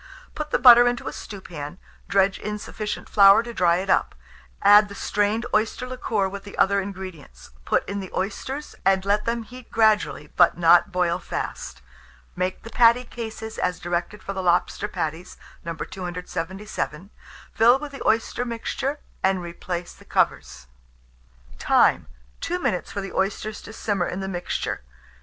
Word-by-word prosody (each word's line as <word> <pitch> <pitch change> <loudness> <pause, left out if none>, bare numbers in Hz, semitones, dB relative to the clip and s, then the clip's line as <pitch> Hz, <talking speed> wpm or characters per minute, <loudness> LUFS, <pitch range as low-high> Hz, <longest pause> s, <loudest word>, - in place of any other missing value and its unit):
Put 305 0 -5
the - - +2
butter 245 -1 +8
into 245 0 -1
a - - -4
stewpan, 175 -6 -8 0.3
dredge 195 -1 +2
in 210 0 -4
sufficient 210 0 -5
flour 200 +2 +7
to 235 0 -7
dry 175 -5 +3
it 185 +2 -2
up; - - +1 0.5
add 205 +1 +7
the 200 - -9
strained 210 +3 0
oyster 220 +4 +1
liquor 235 -6 -1
with 195 +1 -7
the 200 - -11
other 200 0 +3
ingredients; 185 - -9
put - - +1
in 200 0 -3
the 190 -2 -6
oysters, 260 +9 -4
and 190 0 +2
let 205 +1 +1
them 230 0 -1
heat 250 +2 -13
gradually, 215 -9 +2
but - - +5
not 175 +2 +5
boil 180 -2 +1
fast. - - -6 0.5
Make 185 +1 -2
the 230 - -10
patty 235 +1 +5
cases 225 -2 -7
as 180 -1 -1
directed 175 +3 -3
for 195 - -4
lobster 185 +2 +1
patties, 170 -2 -5 0.3
No. 170 0 -4
277: 180 +1 -5 0.4
fill 235 +3 +5
with 295 +1 -7
the 275 - -9
oyster 225 +2 +1
mixture, 250 +4 -3 0.2
and 190 0 +2
replace 175 0 -5
the - - -18
covers. 65 - -1 0.9
Time. - - +3 0.3
2 355 - -2
minutes 185 - -2
for 200 - -3
the 195 - -7
oysters 205 +2 -2
to - - -10
simmer 205 -5 -1
in 185 - -4
the 190 - -4
mixture. 180 -2 -3
200 Hz, 160 wpm, -24 LUFS, 180-225 Hz, 0.9 s, butter